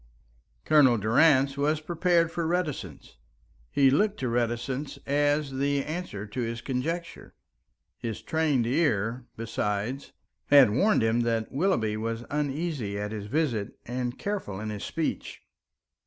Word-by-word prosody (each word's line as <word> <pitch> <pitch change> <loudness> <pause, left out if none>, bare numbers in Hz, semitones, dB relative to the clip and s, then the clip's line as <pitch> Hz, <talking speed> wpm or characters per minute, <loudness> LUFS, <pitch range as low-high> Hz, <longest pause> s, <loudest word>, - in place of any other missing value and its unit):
Colonel 140 -6 +5
Durrance 135 +5 +4
was 150 +2 +1
prepared 170 +1 +1
for 165 -1 -2
reticence, 150 - -3 0.5
he 135 -2 +4
looked 205 +8 +2
to 130 - 0
reticence 120 +4 -2
as 145 0 +1
the 140 +1 0
answer 155 - -5
to 110 +4 -5
his 115 0 -3
conjecture. 160 +8 -4 0.6
His 115 -3 -5
trained 155 -7 +1
ear, 120 -3 0
besides, 110 +3 -3 0.4
had 140 -6 +7
warned 200 - +3
him 115 +1 +2
that 115 -2 0
Willoughby 130 - +1
was 115 +1 -3
uneasy 145 -7 -2
at 105 +1 -3
his 105 -2 -5
visit 120 -6 -1
and 125 +1 -3
careful 195 - -4
in 110 0 -4
his 105 -1 -6
speech. - - -3
130 Hz, 130 wpm, -27 LUFS, 115-155 Hz, 0.6 s, had